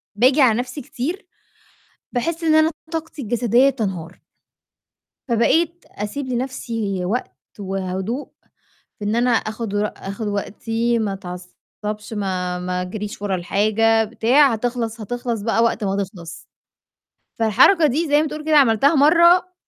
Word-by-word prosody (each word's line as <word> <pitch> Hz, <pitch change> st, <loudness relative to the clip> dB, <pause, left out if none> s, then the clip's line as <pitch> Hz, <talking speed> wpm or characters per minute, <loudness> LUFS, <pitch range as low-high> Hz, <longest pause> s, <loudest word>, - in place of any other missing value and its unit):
بآجي 260 Hz, +6 st, +4 dB
على 235 Hz, -3 st, +4 dB
نفسي 250 Hz, +4 st, -5 dB
كتير، 335 Hz, -, -5 dB, 0.9 s
باحس 330 Hz, +7 st, -2 dB
إن 310 Hz, -1 st, +3 dB
أنا 315 Hz, +1 st, +4 dB, 0.2 s
طاقتي 320 Hz, -3 st, -5 dB
الجسديّة 240 Hz, +3 st, +3 dB
بتنهار. 185 Hz, -8 st, -5 dB, 1.1 s
فبقيت 325 Hz, +9 st, +1 dB
أسيب 235 Hz, +7 st, -5 dB
لنفسي 230 Hz, -7 st, -3 dB
وقت، 230 Hz, +7 st, -2 dB, 0.3 s
وهدوء 190 Hz, +6 st, -4 dB, 0.7 s
في 205 Hz, -, -5 dB
إن 210 Hz, +2 st, 0 dB
أنا 245 Hz, +1 st, +2 dB
آخُد 220 Hz, -1 st, -2 dB
ور 205 Hz, +1 st, +1 dB
آخُد 200 Hz, +2 st, -5 dB
وقتي، 225 Hz, +3 st, -1 dB
ما 205 Hz, -3 st, -1 dB
أتعصّبش، 195 Hz, +3 st, -8 dB
ما 185 Hz, -3 st, -2 dB
ما 180 Hz, 0 st, -2 dB
أجريش 205 Hz, +2 st, -6 dB
ورا 200 Hz, -2 st, -1 dB
الحاجة، 215 Hz, +5 st, +2 dB
بتاع، 240 Hz, +5 st, +3 dB
هتخلص 230 Hz, -1 st, -3 dB
هتخلص 240 Hz, 0 st, -3 dB
بقى 225 Hz, +1 st, +1 dB
وقت 230 Hz, -1 st, 0 dB
ما 195 Hz, 0 st, -1 dB
تخلص. 175 Hz, -3 st, -11 dB, 0.9 s
فالحركة 265 Hz, -, +5 dB
دي 300 Hz, +4 st, 0 dB
زَي 295 Hz, +1 st, +4 dB
ما 315 Hz, -, -2 dB
تقول 300 Hz, +1 st, -7 dB
كده 310 Hz, -1 st, +3 dB
عملتها 275 Hz, +3 st, +4 dB
مرّة 340 Hz, +5 st, +5 dB
225 Hz, 135 wpm, -21 LUFS, 205-275 Hz, 1.1 s, فالحركة